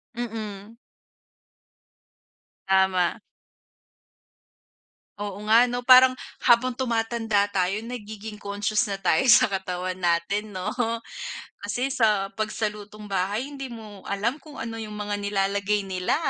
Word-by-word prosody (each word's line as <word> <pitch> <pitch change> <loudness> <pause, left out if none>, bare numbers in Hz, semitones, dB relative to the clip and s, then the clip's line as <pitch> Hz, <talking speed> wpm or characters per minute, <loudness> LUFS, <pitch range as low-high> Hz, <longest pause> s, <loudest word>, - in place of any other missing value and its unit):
Mm. 220 -2 -6 1.9
Tama. 190 0 +3 2.0
Oo 205 -1 -5
nga 230 +3 +7
'no, 245 0 -2
parang 255 +1 +8 0.3
habang 245 +1 +4
tumatanda 225 -4 +1
tayo 195 +1 0
nagiging 220 -2 -7
conscious 210 +2 -1
na 195 -2 -4
tayo 195 +7 +3
sa 240 -4 +7
katawan 185 -1 -3
natin 185 +4 0
'no. 185 +2 -3 0.9
Kasi 245 +7 -2
sa 210 -5 +2
'pag 215 +2 -2
sa 215 0 -1
lutong 210 0 -11
bahay 200 +3 -1
hindi 275 -1 -7
mo 220 -4 -10
alam 230 +9 -1
kung 300 -2 -13
ano 225 0 -5
yung 210 -1 -7
mga 205 0 -3
nilalagay 200 0 0
nila. 185 +5 0
210 Hz, 120 wpm, -25 LUFS, 195-230 Hz, 2.0 s, parang